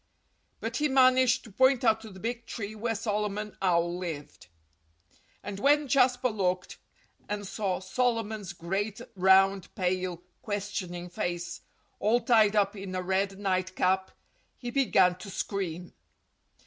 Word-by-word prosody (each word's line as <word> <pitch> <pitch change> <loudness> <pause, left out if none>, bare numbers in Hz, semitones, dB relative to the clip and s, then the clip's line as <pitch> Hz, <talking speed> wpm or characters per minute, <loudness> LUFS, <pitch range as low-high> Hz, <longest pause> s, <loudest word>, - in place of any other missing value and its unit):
But - - -3
he 300 - +2
managed 255 -1 +4
to 220 - -13
point 260 +4 +4
to 220 -2 +1
the 190 -2 -12
big 230 +2 -4
tree 215 -2 -5
where 225 +1 -2
Solomon 210 -1 -2
Owl 175 -1 +1
lived. 150 - -7 1.0
And 200 -1 -6
when 290 +4 +3
Jasper 255 -2 +3
looked, 185 -4 -2 0.5
and 205 0 -3
saw 195 -2 -2
Solomon's 220 0 -1
great, 195 +5 -3 0.2
round, 190 0 +4
pale, 180 -2 -1 0.2
questioning 195 -4 -4
face, 175 -1 -4 0.4
all 220 +4 +3
tied 220 -3 +4
up 200 0 +2
in 195 -2 -6
a 185 - -2
red 190 +1 0
nightcap, 185 -1 0 0.5
he 240 -1 -6
began 190 -9 +3
to 195 - -8
scream. 180 -3 -4
200 Hz, 130 wpm, -29 LUFS, 185-225 Hz, 1.0 s, managed